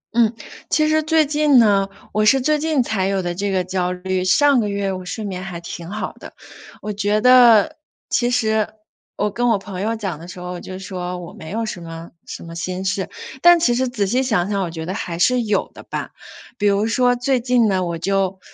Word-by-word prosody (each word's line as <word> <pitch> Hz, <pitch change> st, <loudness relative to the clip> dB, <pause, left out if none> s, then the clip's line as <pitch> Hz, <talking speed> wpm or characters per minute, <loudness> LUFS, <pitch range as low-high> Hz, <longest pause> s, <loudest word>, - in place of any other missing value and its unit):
嗯， 230 Hz, -2 st, +4 dB, 0.4 s
其 310 Hz, -1 st, +2 dB
实 310 Hz, 0 st, +3 dB
最 315 Hz, 0 st, +3 dB
近 295 Hz, -2 st, +3 dB
呢， 200 Hz, -4 st, +4 dB, 0.2 s
我 215 Hz, +1 st, +1 dB
是 265 Hz, +6 st, +5 dB
最 300 Hz, +3 st, +1 dB
近 305 Hz, -5 st, +1 dB
才 195 Hz, -4 st, -1 dB
有 195 Hz, -1 st, -1 dB
的 175 Hz, 0 st, -2 dB
这 200 Hz, +3 st, -2 dB
个 185 Hz, -1 st, 0 dB
焦 180 Hz, 0 st, -1 dB
虑， 185 Hz, 0 st, -2 dB
上 280 Hz, +7 st, +4 dB
个 210 Hz, -2 st, 0 dB
月 200 Hz, -1 st, -1 dB
我 185 Hz, 0 st, -6 dB
睡 215 Hz, +3 st, -5 dB
眠 185 Hz, -2 st, -4 dB
还 180 Hz, -3 st, -6 dB
挺 170 Hz, 0 st, -8 dB
好 210 Hz, +1 st, -4 dB
的。 -, -, -11 dB, 0.5 s
我 210 Hz, -, -3 dB
觉 205 Hz, +1 st, +1 dB
得 240 Hz, -3 st, +6 dB, 0.3 s
其 240 Hz, 0 st, +2 dB
实 220 Hz, -3 st, +1 dB, 0.5 s
我 210 Hz, 0 st, -1 dB
跟 245 Hz, +3 st, 0 dB
我 220 Hz, -, +3 dB
朋 190 Hz, -1 st, -7 dB
友 225 Hz, +2 st, -1 dB
讲 195 Hz, -8 st, -4 dB
的 170 Hz, -, -10 dB
时 180 Hz, 0 st, -9 dB
候， 180 Hz, 0 st, -6 dB
我 180 Hz, -, -6 dB
就 185 Hz, -, -8 dB
说： 180 Hz, -2 st, -5 dB
“我 175 Hz, -1 st, -9 dB
没 160 Hz, -, -10 dB
有 225 Hz, +3 st, -2 dB
什 185 Hz, -5 st, -6 dB
么 165 Hz, 0 st, -9 dB, 0.2 s
什 -, -, -7 dB
么 165 Hz, -, -9 dB
心 180 Hz, +3 st, -4 dB
事。” 190 Hz, 0 st, -1 dB, 0.3 s
但 345 Hz, 0 st, +7 dB
其 245 Hz, -6 st, +2 dB
实 255 Hz, +1 st, 0 dB
仔 215 Hz, -5 st, -1 dB
细 245 Hz, +7 st, +1 dB
想 205 Hz, -8 st, +1 dB
想， 200 Hz, -1 st, 0 dB
我 170 Hz, -, -3 dB
觉 160 Hz, -1 st, -6 dB
得 185 Hz, -, -3 dB
还 175 Hz, -5 st, -4 dB
是 250 Hz, +7 st, +3 dB
有 210 Hz, -3 st, -1 dB
的 -, -, -11 dB
吧。 -, -, -5 dB, 0.5 s
比 205 Hz, -, +1 dB
如 200 Hz, +1 st, +2 dB
说 245 Hz, +1 st, +2 dB
最 250 Hz, +1 st, +1 dB
近 245 Hz, -1 st, +2 dB
呢， 190 Hz, -2 st, +1 dB
我 170 Hz, -1 st, -3 dB
就 195 Hz, +1 st, -1 dB
200 Hz, 245 characters per minute, -20 LUFS, 185-245 Hz, 0.5 s, 但